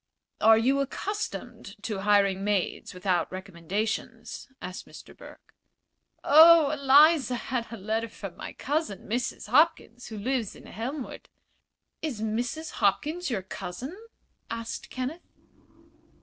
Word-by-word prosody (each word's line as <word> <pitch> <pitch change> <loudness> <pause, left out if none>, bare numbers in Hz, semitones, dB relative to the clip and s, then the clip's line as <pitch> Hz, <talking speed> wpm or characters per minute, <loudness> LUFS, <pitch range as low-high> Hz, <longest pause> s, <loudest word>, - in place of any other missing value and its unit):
"Are 225 0 +7
you 260 +5 +2
accustomed 275 - -4
to 210 -4 -3
hiring 200 -1 +3
maids 205 -3 -1
without 180 -2 0
recommendations?" 190 - -4
asked 185 +5 -7
Mr. - - -13
Burke. - - -15 0.7
"Oh, 315 0 +8
Eliza 285 -1 +5
had 240 -1 -3
a 230 - -6
letter 220 +3 -2
from 195 -4 -8
my - - -7
cousin, 290 -7 -2
Mrs. 240 -1 -3
Hopkins, 260 -3 +2
who 220 - -7
lives 235 0 -2
in - - -14
Elmwood." 255 +5 -6 0.7
"Is 285 -9 -3
Mrs. 240 +9 -2
Hopkins 305 - +1
your 210 -7 -2
cousin?" 215 - -6 0.5
asked 230 0 -5
Kenneth. 260 +7 -6
230 Hz, 120 wpm, -27 LUFS, 205-280 Hz, 0.7 s, Oh